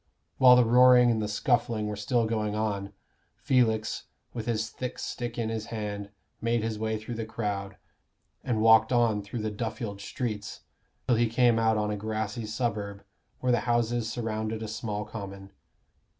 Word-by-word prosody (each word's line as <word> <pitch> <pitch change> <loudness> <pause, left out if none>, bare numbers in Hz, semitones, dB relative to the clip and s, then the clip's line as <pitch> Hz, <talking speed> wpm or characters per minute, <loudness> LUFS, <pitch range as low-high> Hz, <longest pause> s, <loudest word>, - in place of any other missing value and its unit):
While 125 -2 +9
the 125 -1 +5
roaring 125 +1 +6
and 110 -1 0
the 105 - -1
scuffling 115 0 0
were 105 0 -3
still 115 +3 +1
going 110 -2 -1
on, 100 -2 -2 0.5
Felix, 110 -4 +1 0.3
with 115 -1 -5
his 110 -2 0
thick 125 -1 -5
stick 120 -2 -5
in 115 -2 -1
his 110 -1 -4
hand, 105 -2 -4 0.3
made 115 0 +1
his 110 -1 -3
way 110 0 -1
through 110 +3 -7
the 115 0 -3
crowd, 100 -3 -4 0.7
and 115 -4 0
walked 110 0 +6
on 115 -4 +3
through 105 +3 -5
the 110 - -1
Duffield 110 -1 -4
streets, 110 -1 -4 0.4
till 120 - +3
he 120 0 +2
came 115 0 +3
out 110 -1 +3
on 105 0 0
a 105 - -2
grassy 110 +1 -3
suburb, 105 -3 -3 0.4
where 125 - +2
the 120 - +3
houses 120 -1 +1
surrounded 110 -1 -3
a - - -4
small 105 -1 -4
common. 100 -2 -8
110 Hz, 170 wpm, -28 LUFS, 105-120 Hz, 0.7 s, While